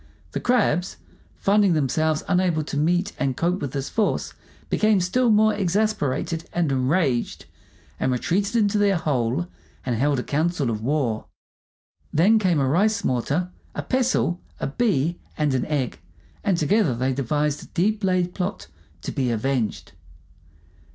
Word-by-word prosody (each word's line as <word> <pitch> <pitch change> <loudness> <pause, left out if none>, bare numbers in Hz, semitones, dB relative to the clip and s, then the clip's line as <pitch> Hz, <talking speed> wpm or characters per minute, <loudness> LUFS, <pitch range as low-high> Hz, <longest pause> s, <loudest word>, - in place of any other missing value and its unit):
The - - -2
crabs, 195 -8 +1 0.4
finding 200 -2 +3
themselves 155 +1 +1
unable 180 -4 +1
to 145 - -6
meet 175 +6 +1
and 135 -2 -1
cope 175 +3 0
with 140 - -4
this 135 -1 -3
force, 220 -2 -1 0.3
became 215 -2 +3
still 235 +8 +1
more 215 0 +4
exasperated 180 -5 -1
and 170 -5 +1
enraged, 135 -1 0 0.5
and 130 - +1
retreated 195 - 0
into 210 -2 +2
their 200 -1 +3
hole 120 - 0 0.4
and 120 - 0
held 140 +4 +1
a 125 - -2
council 155 -3 0
of 110 -1 -3
war. 125 -4 -1 0.8
Then 205 +8 +4
came 180 -7 +2
a 135 - +2
rice 200 +8 +2
mortar, 145 +8 -1 0.2
a - - -3
pestle, 255 -9 0 0.2
a - - -2
bee, 170 - 0 0.2
and 150 -3 +1
an 130 - 0
egg, 145 -5 -2 0.4
and 195 -4 +2
together 170 - +2
they 130 +3 0
devised 145 +3 -1
a - - -12
deep 210 +4 0
laid 180 -2 +1
plot 190 +2 -3 0.4
to - - -3
be 130 -4 -1
avenged. 120 0 -1
165 Hz, 150 wpm, -23 LUFS, 135-200 Hz, 0.8 s, more